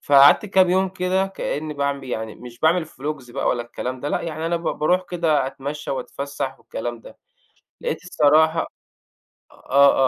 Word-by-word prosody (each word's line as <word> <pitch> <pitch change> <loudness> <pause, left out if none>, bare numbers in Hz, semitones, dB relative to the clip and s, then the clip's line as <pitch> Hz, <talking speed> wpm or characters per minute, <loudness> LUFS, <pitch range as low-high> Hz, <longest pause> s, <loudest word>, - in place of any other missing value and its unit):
فقعَدت 140 +8 +6
كام 190 -2 +4
يوم 190 +1 +3
كده 185 +1 0
كأني 155 -5 -4
باعم 140 -1 -1
يعني 110 -4 -4
مش 120 -1 -12
باعمل 165 +1 +3
فلوجز 145 -4 -6
بقى 130 - -1
ولا 120 - +1
الكلام 125 +2 -5
ده 145 - -2
لأ، - - 0
يعني 160 0 -4
أنا 170 0 +1
ب 170 - -6
بارُوح 180 +4 +1
كده 160 -6 +1
أتمشّى 145 +3 -5
وأتفسّح 135 +1 -4
والكلام 120 0 -5
ده، - - -14 0.6
لقيت 480 - -3
الصراحة 160 -1 +3 0.8
آه، 140 0 +4
145 Hz, 160 wpm, -22 LUFS, 135-170 Hz, 0.8 s, فقعَدت